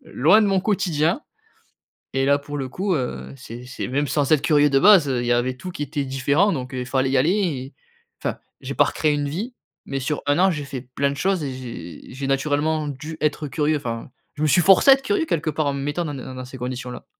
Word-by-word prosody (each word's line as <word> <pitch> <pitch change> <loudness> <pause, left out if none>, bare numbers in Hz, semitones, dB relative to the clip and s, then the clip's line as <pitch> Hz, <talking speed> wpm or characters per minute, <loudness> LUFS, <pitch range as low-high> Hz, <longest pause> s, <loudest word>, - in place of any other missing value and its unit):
loin 165 - +4
de - - +3
mon 195 -1 +2
quotidien 180 - +1 0.9
et 135 0 +1
là 140 +1 +4
pour 145 +1 -6
le 135 -2 -3
coup 190 +8 -1
heu, 125 -1 -4
c'est 125 -1 -9
c'est 125 - -5
même 145 +3 0
sans 145 +1 0
être 150 - +5
curieux 150 -2 +4
de 135 -1 +3
base, 185 -3 +7
heu, 125 -2 0
il 120 - -3
y 120 - +2
avait 125 +1 0
tout 180 +8 -7
qui 150 - -4
était 145 0 -3
différent. 140 +9 +2
Donc 130 -2 -5
il 125 -1 -3
fallait 130 +1 0
y 135 - +3
aller 150 +8 +3
et 150 -10 -1 0.5
enfin - - -2 0.2
j'ai - - -5
pas - - +5
recréé 155 -1 0
une 145 -1 -1
vie, 215 - -5 0.3
mais 135 - -3
sur 145 +3 -2
1 145 +3 +3
an 190 +1 +5
j'ai 150 -4 -4
fait 135 -3 -6
plein 140 0 +2
de - - -5
choses 190 0 0
et 135 -2 -3
j'ai 115 -9 -9
j'ai 135 +1 -4
naturellement 150 +3 0
dû 150 +3 -7
être 150 0 0
curieux. 150 +3 0
Enfin 115 -3 -5 0.2
je 150 - -7
me - - +3
suis 175 +4 +4
forcé 195 +9 +6
à - - +12
être 270 - -11
curieux 360 +2 +1
quelque 160 - -1
part 150 0 -1
en 140 - 0
me 140 - -4
mettant 145 +5 -1
dans 150 - -4
des 130 - -7
dans 130 - -8
dans 130 0 -6
ces 130 +1 -10
conditions 125 0 -5
là. - - -9
145 Hz, 260 wpm, -22 LUFS, 130-160 Hz, 0.9 s, à